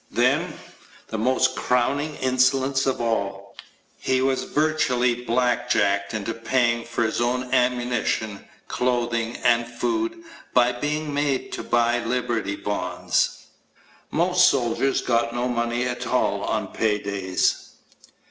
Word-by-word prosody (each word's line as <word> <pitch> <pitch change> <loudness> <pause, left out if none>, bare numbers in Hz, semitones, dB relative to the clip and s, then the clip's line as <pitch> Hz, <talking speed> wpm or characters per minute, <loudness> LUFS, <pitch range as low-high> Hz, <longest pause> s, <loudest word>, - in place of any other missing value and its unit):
Then, - - +1 0.5
the 110 - -3
most 130 +2 +2
crowning 140 +5 0
insolence 130 +1 +2
of 135 - 0
all 100 -4 -2 0.4
he 130 0 +1
was 130 0 0
virtually 125 -6 +1
blackjacked 110 -4 +1
into 110 +1 -3
paying 120 0 0
for 115 0 -1
his 110 +1 -1
own 125 +1 -1
ammunition, 125 -4 0 0.2
clothing, 120 -2 -1
and 120 0 +3
food 335 - -2 0.3
by 125 0 +5
being 150 +4 -3
made 140 -2 -1
to - - -4
buy 120 0 +2
Liberty 115 -4 -1
Bonds. 90 -4 -1 0.6
Most 180 +2 +4
soldiers 135 +1 0
got 115 -1 0
no 120 +1 0
money 120 0 -1
at 125 -1 -3
all - - 0
on - - -2
pay 110 -2 0
days. 100 -2 -1
120 Hz, 120 wpm, -24 LUFS, 115-130 Hz, 0.6 s, by